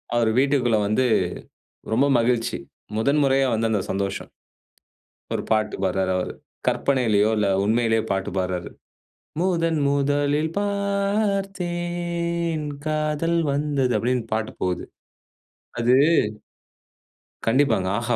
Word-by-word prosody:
அவரு 115 -2 +3
வீட்டுக்குள்ள 130 -5 +2
வந்து 110 +5 +2 0.9
ரொம்ப 130 +5 +3
மகிழ்ச்சி! 115 0 +1 0.4
முதன் 140 +7 +2
முறையா 135 0 +3
வந்த 115 0 +1
அந்த 105 -2 +1
சந்தோஷம். 100 0 -3 1.0
ஒரு - - -2
பாட்டு 110 -1 +1
பாடுறாரு 95 0 0
அவரு. 90 - -3 0.3
கற்பனையிலேயோ 110 -6 +2
இல்ல 105 -1 +2 0.2
உண்மையிலேயே 110 +1 +2
பாட்டு 95 -1 -1
பாடுறாரு. 90 -1 -2 0.7
முதன் 165 -3 +1
முதலில் 145 +2 +1
பார்த்தேன், 180 -5 -1 0.2
காதல் 155 +2 0
வந்தது 140 -3 0
அப்படின்னு 125 0 0
பாட்டு 110 0 -1
போகுது. 90 -1 -1 1.0
அது 120 +1 +3 1.5
கண்டிப்பாங்க. 115 -6 +2
ஆஹா 120 0 0
135 Hz, 100 wpm, -23 LUFS, 110-165 Hz, 1.5 s, அவரு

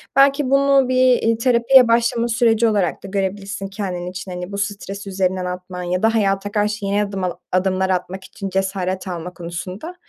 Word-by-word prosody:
Belki 275 0 +4
bunu 275 -1 +4
bir, 255 - +1
eee, 245 -3 +3
terapiye 245 +1 +5
başlama 235 0 +2
süreci 230 -1 +3
olarak 200 -6 0
da 195 - -7
görebilirsin 195 0 -3
kendin 190 -3 -4
için. 185 +1 -7
Hani 180 +1 -6
bu 200 - -4
stresi 200 -1 -4
üzerinden 185 -1 -1
atman 180 0 -6
ya 180 +2 -2
da 225 +1 +3
hayata 200 -1 0
karşı 210 0 -1
yeni 200 +1 +1
adımla 190 -3 -3
adımlar 190 +1 +1
atmak 185 +1 -2
için 195 0 -7
cesaret 190 -1 -2
alma 180 0 -5
konusunda, 180 - -7
195 Hz, 175 wpm, -20 LUFS, 185-230 Hz, -, terapiye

